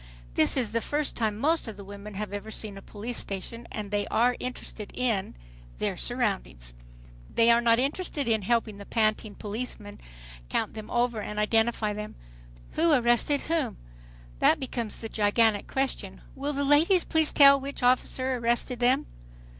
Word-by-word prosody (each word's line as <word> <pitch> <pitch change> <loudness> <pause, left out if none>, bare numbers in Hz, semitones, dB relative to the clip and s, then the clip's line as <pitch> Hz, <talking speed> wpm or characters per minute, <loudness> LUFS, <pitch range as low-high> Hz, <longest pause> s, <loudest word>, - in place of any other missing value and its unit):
This - - +4
is 235 -5 0
the 230 +1 0
first 295 +3 -2
time 215 -3 -1
most 315 +4 +1
of 215 -3 -7
the 200 - -9
women 200 +1 -9
have 205 0 -5
ever 205 +2 -5
seen 215 -2 -4
a 195 - -9
police 225 +4 -6
station, 215 +4 -6
and 210 -2 -5
they 205 -1 0
are 245 +2 +2
interested 240 -4 -6
in, 230 -6 -1 0.4
their - - -1
surroundings. - - -3 0.6
They 230 +1 +5
are 235 0 +4
not 230 -1 +4
interested 285 +2 -1
in 220 -2 +2
helping 220 0 0
the 200 - -9
panting 215 -2 0
policeman 210 -1 -6 0.5
count - - -1
them 215 -1 -8
over 240 -2 0
and 210 0 -6
identify 220 0 +1
them. 210 +1 -7 0.6
Who 330 +1 +2
arrested 250 +2 +3
whom? 310 -9 -1 0.6
That - - +4
becomes 240 -4 -3
the 225 - -5
gigantic 215 0 +2
question. 265 -8 -3
"Will 285 +2 -3
the 280 0 -1
ladies 325 +6 +4
please 320 -2 +3
tell 280 -1 +7
which 275 -1 -6
officer 255 +1 +2
arrested 240 +1 +1
them?" 245 +1 +3
230 Hz, 165 wpm, -27 LUFS, 210-260 Hz, 0.6 s, tell